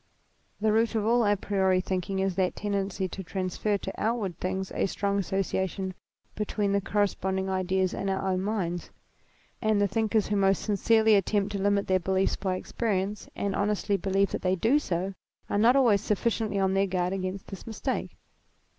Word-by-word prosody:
The 215 +1 +2
root 225 +1 +2
of 215 -1 +1
all 235 +1 +4
a 205 -1 +3
priori 190 -2 +1
thinking 185 +1 -2
is 190 0 +1
the 185 -1 +2
tendency 200 -2 -2
to 190 - -6
transfer 190 +3 -1
to 195 - -6
outward 215 -5 -1
things 190 +1 -2
a - - +1
strong 200 +1 -1
asso 195 +1 0
ciation 190 0 -2 0.4
between 210 -1 -1
the 200 0 +2
corresponding 190 -1 0
ideas 185 0 0
in 195 - -2
our 190 0 -1
own 185 0 0
minds; 185 -4 -2 0.7
and 215 -2 +2
the 205 - +3
thinkers 220 +1 +1
who 210 - +1
most 195 -1 +2
sincerely 220 +1 +3
attempt 200 0 +2
to 200 - -3
limit 200 0 +2
their 185 0 +2
beliefs 190 +1 +1
by 190 -2 -2
experience, 200 0 -2
and 200 -1 -2
honestly 205 0 0
believe 195 +1 +1
that - - -3
they 185 0 +2
do 230 - +3
so, 190 - -2 0.4
are 205 - +2
not 235 +4 +5
always 235 -7 +4
sufficiently 215 0 0
on 190 -1 +2
their 195 +1 +2
guard 180 0 -1
against 190 0 -4
this 195 +2 -9
mistake. 220 - -3
195 Hz, 180 wpm, -28 LUFS, 190-210 Hz, 0.7 s, not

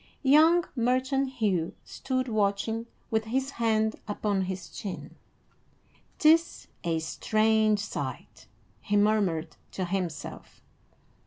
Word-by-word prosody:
Young 315 +5 +6
merchant 260 +2 +1
Hugh 195 -9 0
stood 260 -1 -3
watching, 220 +1 0 0.2
with 220 -1 +1
his 265 +4 -1
hand 220 -1 +2
upon 205 -2 -1
his 185 0 -5
chin. 195 -3 -7 1.0
"'Tis 325 +2 +3 0.2
a 165 -1 0
strange 215 +5 +2
sight," 215 - -6 0.3
he 205 0 0
murmured 195 -7 +1 0.2
to 185 - -2
himself. 180 -3 -5
220 Hz, 100 wpm, -28 LUFS, 195-255 Hz, 1.0 s, Young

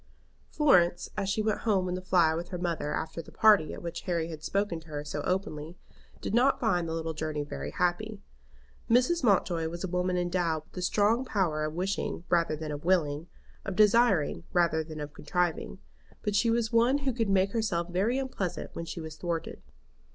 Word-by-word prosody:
Florence, 180 - +3
as 195 - -1
she 215 +2 0
went 215 -1 0
home 195 -5 +1
in 180 - -2
the 185 - -3
fly 175 -3 +3
with 170 +2 -4
her 180 - -4
mother 170 -4 -2
after 160 +1 -3
the - - -15
party 210 -8 +5
at - - -8
which 170 0 -5
Harry 170 -2 0
had 155 -2 -8
spoken 195 0 -1
to 160 - -18
her 145 -2 -5
so 145 0 -3
openly, 180 -3 -3 0.4
did - - -4
not 250 +4 +4
find 180 -8 +1
the - - -2
little 165 0 -3
journey 155 -1 -3
very 145 - -5
happy. 200 +4 -1 0.7
Mrs. 255 +8 +3
Mountjoy 180 -6 +2
was 170 +2 -6
a - - -1
woman 180 0 0
endowed 175 -3 0
with - - -18
a - - -2
strong 210 +6 +2
power 180 -11 0
of 155 +1 -4
wishing 185 -1 -2
rather 170 -2 +2
than 155 0 -5
of 145 0 -6
willing, 165 -3 +1 0.4
of 195 - -4
desiring 210 -6 +4
rather 170 -3 +2
than 155 -1 -8
of 150 0 -6
contriving; 175 - -1 0.5
but 210 - -1
she 230 +3 +3
was 230 0 0
one 240 +4 +4
who 265 - +1
could 225 -3 -1
make 195 0 +3
herself 195 -7 -1
very 195 +8 0
unpleasant 255 -9 -3
when 170 - -5
she 170 - -6
was 160 -1 -8
thwarted. 170 -1 -4
180 Hz, 200 wpm, -29 LUFS, 160-205 Hz, 0.7 s, party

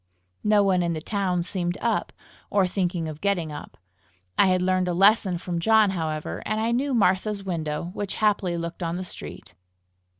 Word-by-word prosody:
No 210 -1 +4
one 190 -2 +3
in 170 -1 0
the 160 - -3
town 180 0 -1
seemed 175 -1 -2
up, - - 0 0.4
or 200 -2 +3
thinking 180 -3 -1
of 155 -1 -7
getting 180 -6 0
up. 145 - -9 0.6
I - - +5
had 185 0 +3
learned 185 0 +1
a 175 - 0
lesson 195 -1 +4
from 170 0 -3
John, 215 +2 +4
however, 155 - -3
and 215 +1 -1
I 225 +1 0
knew 260 +2 0
Martha's 200 0 +1
window, 170 -2 -3
which 205 -1 -3
happily 200 -5 +1
looked 170 +1 -5
on 170 0 -2
the 185 - -4
street. 180 - -8
185 Hz, 180 wpm, -25 LUFS, 170-200 Hz, 0.6 s, I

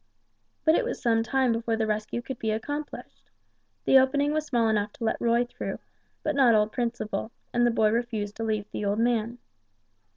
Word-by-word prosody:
But 315 - +6
it 425 - +3
was 485 - -3
some 230 -3 +2
time 260 +1 +1
before 230 0 0
the 220 0 0
rescue 215 +2 -2
could 260 0 -6
be 220 - -2
accomplished. 290 +8 -5 0.6
The 270 - +7
opening 285 +3 +2
was 310 0 -1
small 235 -5 +2
enough 210 -1 +1
to - - -8
let 220 - -1
Roy 235 +1 +3
through, 240 - -5 0.5
but 305 - 0
not 255 -5 +5
old 210 0 +2
Principle, 230 -3 -3 0.2
and 240 0 +3
the - - +4
boy 220 -2 +2
refused 225 -3 -2
to 225 - -3
leave 215 -2 -1
the - - -4
old 205 +1 0
man. 235 0 0
230 Hz, 195 wpm, -27 LUFS, 220-255 Hz, 0.6 s, The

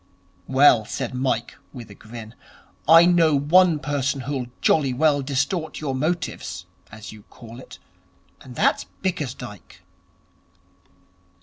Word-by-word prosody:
'Well,' 130 -4 +5
said 130 +3 -5
Mike, 125 -2 -2 0.2
with 120 -5 -10
a - - -10
grin, 110 +2 -11 0.5
'I 165 +2 +8
know 170 -3 +3
one 165 +4 +4
person 140 -2 -2
who'll 130 -1 -4
jolly 140 -5 +2
well 145 +1 +2
distort 150 +5 -2
your 145 -3 -3
motives, 155 +7 -3 0.3
as 110 0 -10
you 110 - -13
call 115 +1 -13
it, - - -13 0.6
and 130 -3 -12
that's - - +1 0.2
Bickersdyke.' 125 - -6
135 Hz, 120 wpm, -22 LUFS, 120-155 Hz, 0.6 s, I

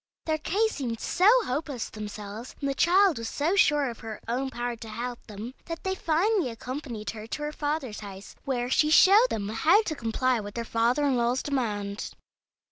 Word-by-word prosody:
Their 315 -1 0
case 435 +8 0
seemed 235 -5 -3
so 370 +3 +3 0.2
hopeless 275 -2 -3
to - - -11
themselves, 210 +2 -7
and 280 - -2
the 275 - 0
child 360 -1 +4
was 230 - -4
so 320 +6 0
sure 295 -7 +4
of 235 -2 -6
her 220 -1 -7
own 255 +3 -1
power 240 -1 -3
to 225 -1 -9
help 240 +2 -5
them, 215 +3 -7
that 330 -1 -6
they 380 - 0
finally 360 - +1
accompanied 240 -1 -5
her 220 -1 -9
to 295 +6 -4
her 300 - -2
father's 290 -7 -3
house, 200 -1 -9
where 245 -3 -1
she 300 +4 +3
showed 400 +9 +7
them 200 -1 -3
how 320 - +4
to 340 - -2
comply 245 0 0
with 205 -1 -7
their 235 -1 -3
father 235 +6 +1
in 270 -3 +2
law's 240 +2 +1
demand. 210 -7 -2
255 Hz, 200 wpm, -27 LUFS, 225-310 Hz, 0.2 s, showed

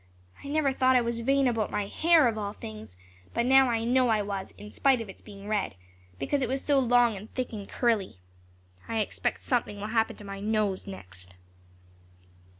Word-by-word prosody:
I - - -8
never 285 -2 +1
thought 260 0 +3
I 250 - +5
was 235 0 -2
vain 270 +3 +2
about 225 -3 0
my 205 - -1
hair, 320 +5 +4
of 230 - 0
all 205 -1 -4
things, 110 - -10 0.4
but 235 - +1
now 265 0 +6
I 225 -1 0
know 250 +2 +3
I 215 -2 +2
was, 200 -1 -5
in 210 0 -10
spite 270 -3 +3
of 225 -3 -6
its - - -12
being 200 -1 -11
red, 210 - -1 0.4
because 275 - -1
it 250 - -1
was 265 +1 -2
so 285 -2 +3
long 245 -3 +4
and 200 +3 -10
thick 255 -2 -3
and 205 -2 -7
curly. 225 - 0 0.7
I 225 - -2
expect 215 - -2
something 235 -5 -1
will 210 +1 -4
happen 225 -1 +1
to 210 - -12
my 195 -1 -7
nose 210 -2 -1
next." 90 - -10
225 Hz, 200 wpm, -28 LUFS, 200-255 Hz, 0.7 s, now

